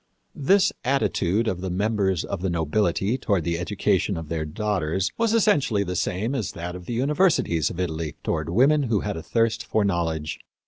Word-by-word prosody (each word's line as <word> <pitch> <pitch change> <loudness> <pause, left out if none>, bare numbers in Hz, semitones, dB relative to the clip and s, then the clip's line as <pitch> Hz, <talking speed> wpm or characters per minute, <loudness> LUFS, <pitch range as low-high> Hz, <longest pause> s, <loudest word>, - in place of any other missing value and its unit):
" - - -47 0.2
This 200 +1 +5
attitude 115 -6 +1
of 90 -4 -2
the 95 - -3
members 100 -1 0
of 100 - -4
the 95 - 0
nobility 90 - 0
toward 100 -8 0
the 85 +1 -1
education 100 0 0
of 80 -2 -7
their 80 -2 -2
daughters 95 0 -1
was 230 -1 +1
essentially 140 - +3
the 90 -1 -4
same 95 +7 -1
as 115 -9 -2
that 85 +1 -5
of 90 -1 -10
the - - -3
universities 140 - +2
of 90 - -7
Italy 80 -4 -3
toward - - -2
women 135 - +4
who 105 -4 +2
had 105 -1 -3
a 80 - -5
thirst 115 +6 0
for 110 - 0
knowledge. 80 -5 -1
95 Hz, 190 wpm, -24 LUFS, 85-115 Hz, 0.2 s, This